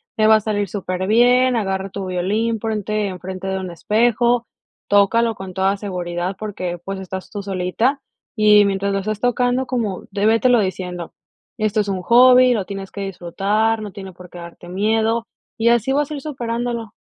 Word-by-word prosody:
te 215 Hz, -1 st, +3 dB
va 220 Hz, -, +7 dB
a -, -, +4 dB
salir 205 Hz, -2 st, -2 dB
superbién, 230 Hz, +7 st, +2 dB
agarra 195 Hz, -3 st, -2 dB
tu 195 Hz, 0 st, -5 dB
violín, 210 Hz, +5 st, -1 dB
ponte 215 Hz, -1 st, -2 dB
enfrente 185 Hz, +1 st, -6 dB
de 190 Hz, 0 st, -1 dB
un 185 Hz, -2 st, -6 dB
espejo, 235 Hz, +5 st, +1 dB, 0.4 s
tócalo 225 Hz, +3 st, +3 dB
con 190 Hz, -1 st, -8 dB
toda 190 Hz, +1 st, +1 dB
seguridad 180 Hz, -2 st, -4 dB
porque, 185 Hz, -5 st, -4 dB
pues, 195 Hz, 0 st, -4 dB
estás 190 Hz, 0 st, -7 dB
tú 205 Hz, -2 st, -5 dB
solita 195 Hz, +8 st, -1 dB, 0.4 s
y 210 Hz, -1 st, +6 dB
mientras 200 Hz, 0 st, -1 dB
lo 195 Hz, -, 0 dB
estás 215 Hz, +1 st, -3 dB
tocando, 245 Hz, +2 st, +1 dB
como, 230 Hz, -7 st, -3 dB
de 205 Hz, +1 st, +1 dB
vete 225 Hz, +3 st, +3 dB
lo 240 Hz, -2 st, +5 dB
diciendo: 180 Hz, -3 st, -4 dB, 0.5 s
"Esto 215 Hz, 0 st, 0 dB
es 205 Hz, -, -4 dB
un 185 Hz, -2 st, -3 dB
hobby, 250 Hz, +3 st, +6 dB
lo 205 Hz, -5 st, -1 dB
tienes 195 Hz, -1 st, -7 dB
que 200 Hz, -, -6 dB
disfrutar, 195 Hz, +4 st, -1 dB
no 205 Hz, -2 st, -6 dB
tiene 190 Hz, -2 st, -9 dB
por 180 Hz, 0 st, -14 dB
qué 175 Hz, -, -12 dB
darte 170 Hz, 0 st, -11 dB
miedo, 220 Hz, +4 st, 0 dB, 0.3 s
y 230 Hz, +1 st, +3 dB
así 240 Hz, +2 st, +2 dB
vas 290 Hz, +2 st, 0 dB
a -, -, -2 dB
ir 280 Hz, -, -6 dB
superándolo". 235 Hz, -5 st, -4 dB
205 Hz, 185 wpm, -20 LUFS, 190-230 Hz, 0.5 s, va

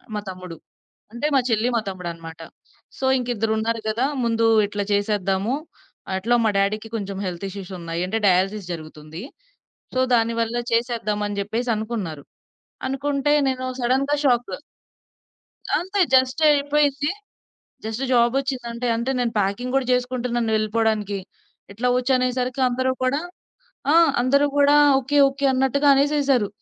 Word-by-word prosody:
మా -, -, -1 dB
తమ్ముడు. 180 Hz, -2 st, -8 dB, 0.6 s
అంటే 265 Hz, +6 st, -1 dB
మా -, -, +6 dB
చెల్లి, 225 Hz, +2 st, +1 dB
మా 230 Hz, -, +2 dB
తమ్ముడనమాట. 170 Hz, -3 st, -7 dB, 0.6 s
సో, 265 Hz, -, -3 dB
ఇంకిద్దరున్నారు 225 Hz, -2 st, -1 dB
గదా! 230 Hz, +5 st, 0 dB, 0.2 s
ముందు 230 Hz, -1 st, +1 dB, 0.2 s
ఇట్లా 205 Hz, 0 st, -3 dB
చేసేద్దాము. 200 Hz, +1 st, 0 dB, 0.6 s
అట్లా 225 Hz, +6 st, +1 dB
మా 220 Hz, -, +4 dB
డ్యాడీకి 210 Hz, +3 st, 0 dB
కొంచెం 200 Hz, -3 st, -4 dB
హెల్త్ 180 Hz, +1 st, -4 dB
ఇష్యూస్ 195 Hz, -1 st, -8 dB
ఉన్నాయి. 170 Hz, 0 st, -4 dB
అంటే 220 Hz, +4 st, -1 dB
డయాలసిస్ 190 Hz, +1 st, +1 dB
జరుగుతుంది. 155 Hz, +1 st, -9 dB, 0.7 s
సో, 255 Hz, -, +1 dB
దానివల్ల 230 Hz, 0 st, 0 dB, 0.2 s
చేసేద్దామని 215 Hz, -4 st, -1 dB
జెప్పేసి 230 Hz, +5 st, -2 dB
అనుకున్నారు. 210 Hz, -9 st, -4 dB, 0.6 s
అనుకుంటే 280 Hz, +2 st, -1 dB, 0.2 s
నేను 255 Hz, 0 st, -3 dB, 0.2 s
సడెన్‌గా 270 Hz, +4 st, +1 dB
షాక్. 245 Hz, -5 st, +2 dB, 1.3 s
అంతే. 380 Hz, +5 st, -3 dB
జస్ట్ 260 Hz, +3 st, +3 dB
అయిపోయింది. 290 Hz, 0 st, +2 dB, 0.8 s
జస్ట్ 220 Hz, +4 st, -3 dB
జాబొచ్చింది. 250 Hz, +1 st, +1 dB
అంటే 240 Hz, +1 st, -3 dB
అంటే 235 Hz, +3 st, -1 dB
నేను 240 Hz, -2 st, -1 dB
ప్యాకింగ్ 205 Hz, +6 st, -1 dB
గూడా 270 Hz, -2 st, +1 dB
జేసుకుంటున్నాను 245 Hz, -2 st, -1 dB
వెళ్ళిపోవడానికి. 215 Hz, -2 st, 0 dB, 0.5 s
ఇట్లా 235 Hz, +5 st, -1 dB
ఒచ్చు 250 Hz, +1 st, 0 dB
అనేసరికి 255 Hz, +1 st, -1 dB
అందరూ 255 Hz, +1 st, 0 dB
కూడా 275 Hz, +4 st, +1 dB, 0.7 s
ఆ! -, -, +4 dB, 0.3 s
అందరూ 280 Hz, +4 st, +3 dB
గూడా 285 Hz, 0 st, +5 dB, 0.3 s
ఓకే, 285 Hz, +3 st, 0 dB
ఓకే 275 Hz, +1 st, -5 dB
అన్నట్టుగా 270 Hz, +2 st, +2 dB
అనేసేసారు. 275 Hz, -5 st, +2 dB
235 Hz, 125 wpm, -22 LUFS, 205-260 Hz, 1.3 s, మా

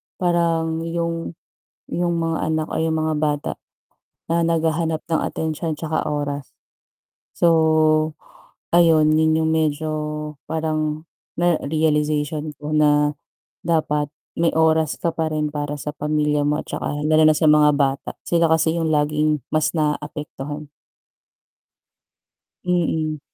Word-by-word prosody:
parang 165 Hz, -2 st, +1 dB
yung 170 Hz, 0 st, -3 dB, 0.6 s
yung 175 Hz, 0 st, 0 dB
mga 165 Hz, -1 st, -1 dB
anak 155 Hz, 0 st, -1 dB
ay 160 Hz, -, 0 dB
yung 160 Hz, -, 0 dB
mga 155 Hz, 0 st, 0 dB
bata 150 Hz, -1 st, -1 dB, 0.8 s
na 170 Hz, 0 st, +2 dB
naghahanap 165 Hz, -1 st, 0 dB
ng 165 Hz, -1 st, 0 dB
atensyon 160 Hz, 0 st, -3 dB
tsaka 160 Hz, -1 st, -2 dB
oras. 145 Hz, -2 st, -3 dB, 0.8 s
So 170 Hz, -, +2 dB, 1.2 s
ayun, 165 Hz, -3 st, +5 dB
yun 160 Hz, 0 st, +3 dB
yung 160 Hz, -, +1 dB
medyo 155 Hz, -1 st, 0 dB, 0.6 s
parang 155 Hz, -1 st, -2 dB, 0.3 s
na 175 Hz, -1 st, +2 dB
realization 150 Hz, 0 st, 0 dB
ko 150 Hz, +1 st, -5 dB
na 150 Hz, -1 st, +4 dB, 0.5 s
dapat 150 Hz, -3 st, 0 dB, 0.2 s
may 165 Hz, 0 st, +2 dB
oras 160 Hz, -1 st, +2 dB
ka 165 Hz, -1 st, -1 dB
pa 160 Hz, -1 st, -1 dB
rin 150 Hz, -1 st, -2 dB
para 145 Hz, 0 st, -3 dB
sa 150 Hz, +1 st, -5 dB
pamilya 150 Hz, 0 st, 0 dB
mo 145 Hz, +1 st, +1 dB
at -, -, -5 dB
tsaka 145 Hz, +1 st, -3 dB
lalo 155 Hz, 0 st, +4 dB
na 155 Hz, -, +3 dB
sa 160 Hz, -, +1 dB
mga 150 Hz, -1 st, +6 dB
bata. 135 Hz, -1 st, 0 dB
Sila 170 Hz, -1 st, +2 dB
kasi 160 Hz, +1 st, +2 dB
yung 160 Hz, -, 0 dB
laging 150 Hz, -2 st, +1 dB
mas 155 Hz, -1 st, +2 dB
naapektuhan. 150 Hz, -1 st, -3 dB, 2.0 s
Mm. 160 Hz, -4 st, 0 dB
155 Hz, 125 wpm, -21 LUFS, 150-160 Hz, 2.0 s, mga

